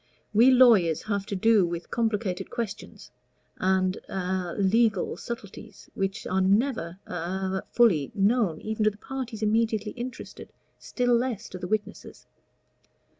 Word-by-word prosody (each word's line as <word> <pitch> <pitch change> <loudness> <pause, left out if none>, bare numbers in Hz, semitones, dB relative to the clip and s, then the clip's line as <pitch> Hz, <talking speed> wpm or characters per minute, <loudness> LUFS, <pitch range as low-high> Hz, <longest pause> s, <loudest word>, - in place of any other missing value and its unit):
We 230 +5 +6
lawyers 225 - +5
have 200 -2 -2
to 200 - -3
do 215 +1 +4
with 170 0 -4
complicated 215 -5 -1
questions, 225 -4 -6 0.5
and 185 0 +1
a 185 -2 -3
legal 210 0 +2
subtleties, 230 -5 -9
which 195 +2 -3
are 190 +1 0
never 195 -3 +1
a 190 +2 -3
fully 190 - +3
known 200 -4 +2
even 220 0 -2
to - - +6
the 205 - -13
parties 245 -2 -6
immediately 220 0 +1
interested, 250 +1 -8 0.3
still 245 -1 0
less 235 -3 -2
to 185 - -8
the 180 - -5
witnesses. 210 0 -4
205 Hz, 130 wpm, -26 LUFS, 185-230 Hz, 0.5 s, We